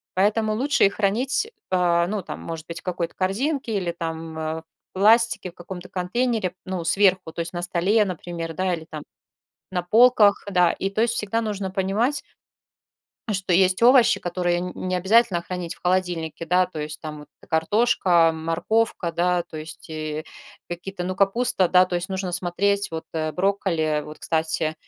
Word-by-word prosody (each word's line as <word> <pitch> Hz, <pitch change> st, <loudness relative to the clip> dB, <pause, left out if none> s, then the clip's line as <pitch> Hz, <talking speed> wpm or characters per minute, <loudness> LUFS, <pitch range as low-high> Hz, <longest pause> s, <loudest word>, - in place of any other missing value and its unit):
Поэтому 215 Hz, +3 st, +2 dB
лучше 275 Hz, +5 st, +3 dB
их 195 Hz, -, +1 dB
хранить, 250 Hz, -, 0 dB, 0.2 s
а, 175 Hz, -2 st, +3 dB
ну, 205 Hz, +1 st, -2 dB
там -, -, -7 dB
может 165 Hz, -1 st, -7 dB
быть 170 Hz, -, -6 dB
в -, -, -40 dB
какой-то 175 Hz, -2 st, -3 dB
корзинке 230 Hz, +5 st, -1 dB
или 180 Hz, -3 st, -1 dB
там, 165 Hz, -1 st, -5 dB
э, 160 Hz, 0 st, -2 dB
в -, -, -31 dB, 0.3 s
пластике 220 Hz, 0 st, +3 dB
в -, -, -38 dB
каком-то 180 Hz, +1 st, -9 dB
контейнере 215 Hz, +2 st, -1 dB
ну 185 Hz, -2 st, -3 dB
сверху, 185 Hz, -1 st, +3 dB
то -, -, -8 dB
есть 165 Hz, +1 st, -5 dB
на 175 Hz, -, -3 dB
столе, 190 Hz, +5 st, +2 dB
например, 170 Hz, -2 st, -5 dB
да 185 Hz, +1 st, 0 dB
или 160 Hz, -1 st, -10 dB
там 155 Hz, -2 st, -7 dB, 0.7 s
на 180 Hz, -1 st, -1 dB
полках, 215 Hz, +1 st, +5 dB
да. 180 Hz, -2 st, +4 dB
И 195 Hz, -, -3 dB
то 215 Hz, +3 st, 0 dB
есть 235 Hz, 0 st, +1 dB
всегда 225 Hz, 0 st, -1 dB
нужно 205 Hz, -3 st, -3 dB
понимать, 205 Hz, +9 st, 0 dB, 1.1 s
что 190 Hz, -2 st, -1 dB
есть 185 Hz, +3 st, +3 dB
овощи, 250 Hz, 0 st, +6 dB
которые 175 Hz, 0 st, -1 dB
нь 180 Hz, 0 st, -4 dB, 0.2 s
не 185 Hz, -, 0 dB
обязательно 190 Hz, -1 st, +3 dB
хранить 180 Hz, -1 st, -5 dB
в -, -, -25 dB
холодильнике, 175 Hz, -3 st, -1 dB
да. 180 Hz, +2 st, +4 dB
То 180 Hz, -, -9 dB
есть 150 Hz, 0 st, -5 dB
там 155 Hz, -1 st, -6 dB
вот 150 Hz, -, -14 dB, 0.2 s
картошка, 175 Hz, -1 st, +3 dB
морковка, 170 Hz, +3 st, -1 dB
да, 175 Hz, +1 st, +1 dB
то -, -, -11 dB
есть 155 Hz, +1 st, -9 dB
и 155 Hz, 0 st, -4 dB, 0.5 s
какие-то, 180 Hz, +1 st, -5 dB
ну, 185 Hz, +1 st, -3 dB
капуста, 195 Hz, 0 st, +2 dB
да, 180 Hz, +1 st, +6 dB
то 180 Hz, -, -2 dB
есть 175 Hz, +1 st, -4 dB
нужно 190 Hz, -1 st, -3 dB
смотреть. 200 Hz, +3 st, 0 dB
Вот 160 Hz, -1 st, -5 dB, 0.3 s
брокколи, 180 Hz, -5 st, 0 dB
вот, 150 Hz, -, -11 dB
кстати, 160 Hz, -1 st, 0 dB
185 Hz, 175 wpm, -23 LUFS, 170-205 Hz, 1.1 s, овощи